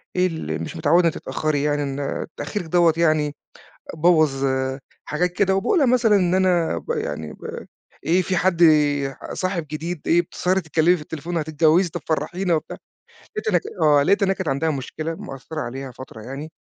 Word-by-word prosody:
إيه 180 0 +3
ال 80 - -4
مش - - -7
متعودة 170 +3 +4
تتأخري 155 -2 -2
يعني، 145 -1 +1
إن 140 0 -3
تأخيرك 205 -5 -4
ده 170 -2 +5
يعني 155 -3 +2 0.6
بوّظ 155 -5 +3
آآ، 130 0 -1 0.3
حاجات 175 +4 0
كده. 190 0 +2
وباقول 325 - +2
لها 275 - +4
مثلًا 235 -4 +4
إن 180 -2 +2
أنا 180 -3 +2
ب - - -9
يعني 465 +2 -4
ب 460 +1 -8 0.4
إيه 180 +3 +3
فيه 185 0 -1
حد 175 -2 +2 0.7
صاحب 185 -3 -2
جديد، 165 +1 -4
إيه 175 +1 +4
بتسهري 185 +2 -1
تتكلّمي 160 +2 +3
في 155 - -8
التليفون، 165 +3 -5
هتتجوزي 160 +3 +2
طب - - -6
فرحينا 175 +3 -1
وبتاع. 155 - -5 0.6
لقيت 435 - -3
إن - - +3 0.2
آه، 145 -2 +5
لقيت 200 +5 +3
إن 190 - +2
هي 195 - +2
كانت 190 -4 -3
عندها 140 +4 0
مشكلة 155 +4 -4
مأثرة 155 -4 -7
عليها 130 +2 -6
فترة 120 -4 -11
يعني 135 +7 -7
165 Hz, 175 wpm, -22 LUFS, 145-185 Hz, 0.7 s, ده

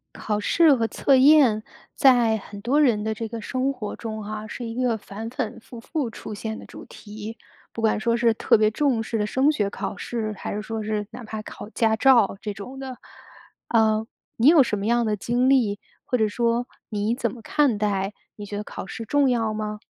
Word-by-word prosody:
考 210 -1 -2
试 320 +7 +4
和 230 -3 0
测 275 - +2
验 260 -5 +6 0.3
在 245 -6 +5
很 205 -1 -10
多 270 +7 +2
人 230 -7 +3
的 220 0 -1
这 225 +1 -5
个 230 +1 -6
生 255 +5 -1
活 215 -6 -6
中 220 -2 -6
哈， 215 +1 -5
是 240 - -6
一 230 0 -5
个 245 -2 +1
反反复复 230 - -5
出 220 - -8
现 220 +1 -5
的 - - -11
主 - - -11
题。 215 +1 -9 0.4
不 230 - -5
管 220 -1 +2
说 230 +1 +1
是 235 -1 +3
特 220 - +3
别 215 0 +3
重 250 -1 +1
视 225 +1 -3
的 210 - 0
升 265 +7 +2
学 205 -8 0
考 - - -5
试， 220 -3 -4
还 - - -5
是 210 - -3
说 220 0 -4
是 210 -1 -2
哪 245 +2 -9
怕 215 -1 -6
考 215 - -9
驾 225 -1 +1
照 230 -5 +4
这 210 - -4
种 205 +7 -9
的。 260 -2 -7 0.7
呃， 220 -1 +3 0.3
你 230 - +3
有 310 -2 +8
什 215 -4 +1
么 200 - -4
样 235 +1 +2
的 215 -1 +1
经 245 +5 +1
历？ 225 -7 +3 0.2
或 250 - 0
者 220 -2 +2
说 235 +3 0 0.2
你 215 +2 -1
怎 235 -3 -1
么 235 - -11
看 275 -1 +2
待？ 200 -1 -1 0.2
你 205 - -8
觉 205 0 -6
得 210 - -3
考 - - -7
试 225 +4 -7
重 285 +3 +3
要 225 -3 0
吗？ 215 0 -4
225 Hz, 235 characters per minute, -24 LUFS, 215-245 Hz, 0.7 s, 有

